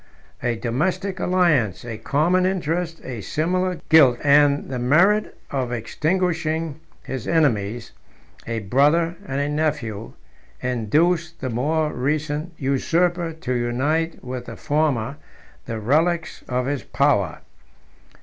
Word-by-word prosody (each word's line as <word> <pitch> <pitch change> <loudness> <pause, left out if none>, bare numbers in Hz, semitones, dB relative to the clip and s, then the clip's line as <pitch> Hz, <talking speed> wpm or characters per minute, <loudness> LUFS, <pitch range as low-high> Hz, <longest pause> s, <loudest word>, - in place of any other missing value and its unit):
A 120 -1 0
domestic 180 - -1
alliance, 170 - +2
a 115 -2 -6
common 170 +6 +2
interest, 175 -2 -1
a 120 -4 -6
similar 180 - -1
guilt, 140 -7 +7
and 145 0 +4
the 130 -2 -4
merit 175 +12 +3
of 130 -3 -2
extinguishing 160 +4 -1 0.2
his 130 -4 -5
enemies, 120 -8 +1 0.6
a 115 -1 -2
brother 150 - +2
and 135 -2 -2
a 145 - 0
nephew, 145 -8 -2 0.5
induced 155 +8 0
the 130 -2 -3
more 150 +6 0
recent 150 +5 -2
usurper 165 +5 +1
to 160 -5 -4
unite 140 +7 -1
with 125 -1 -5
the - - -7
former 145 -4 0 0.5
the 115 -1 -3
relics 160 +9 0
of 125 0 0
his 140 0 -2
power. 130 - +1
145 Hz, 120 wpm, -22 LUFS, 125-165 Hz, 0.6 s, guilt